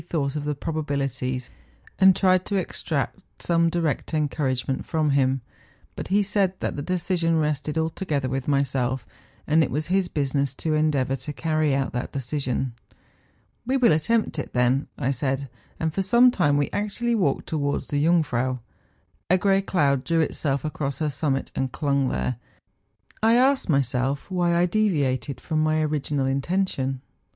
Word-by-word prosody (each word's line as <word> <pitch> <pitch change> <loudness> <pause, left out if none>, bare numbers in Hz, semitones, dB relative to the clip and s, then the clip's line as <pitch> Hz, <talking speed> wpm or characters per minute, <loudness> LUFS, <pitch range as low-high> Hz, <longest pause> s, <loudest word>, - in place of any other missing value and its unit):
39 160 - -23
thought 140 0 -2
of 150 -1 -3
the 150 0 -1
probabilities, 140 -5 -3 0.5
and 190 -1 +7
tried 185 -1 +3
to 200 - -3
extract 165 -3 -2 0.3
gome 170 -1 +3
direct 165 -1 -1
encouragement 135 -3 -1
from 155 -3 0
him; 135 -1 +2 0.5
but - - -5
he 205 +2 +3
said 190 -2 0
that - - -2
the 145 - -3
decision 170 -1 0
rested 150 0 -1
altogether 160 -4 -1
with 130 0 -3
myself, 135 -2 0 0.4
and 160 +2 +4
it - - -1
was 150 +3 -1
his 190 -2 +2
business 140 -3 -1
to 160 +2 -1
endeavour 145 -4 +1
to 135 +3 -6
carry 155 -1 0
out 135 -1 -1
that 125 0 -3
decision. 130 -2 -2 0.5
' - - -39
We 265 +1 +2
will 250 -7 +5
attempt 165 +3 +1
it, - - -5
then,' 125 +3 +2
I 130 - 0
said; 135 +1 -1 0.3
and 160 -1 -1
for 195 - 0
some 240 +6 +5
time 145 - +2
we 145 - 0
actually 210 +4 -1
walked 185 -12 +1
towards 145 -2 -2
the 145 0 0
Jung¬ 165 0 +4
frau. 130 0 -1 0.7
A 185 - +5
grey 195 +1 +3
cloud 140 -9 +1
drew 165 +4 +1
itself 145 -2 -1
across 140 -3 -3
her 155 -2 -1
summit, 135 0 -1
and 130 -1 -1
clung 140 -2 0
there. 125 - -2 0.8
I 225 +2 +5
asked 260 -2 +3
myself 135 +2 0
why 175 -2 +1
I 175 +1 +4
deviated 145 - 0
from 155 -2 -1
my 155 0 +2
original 150 -2 -1
intention 135 -2 -1
150 Hz, 165 wpm, -24 LUFS, 135-175 Hz, 0.8 s, and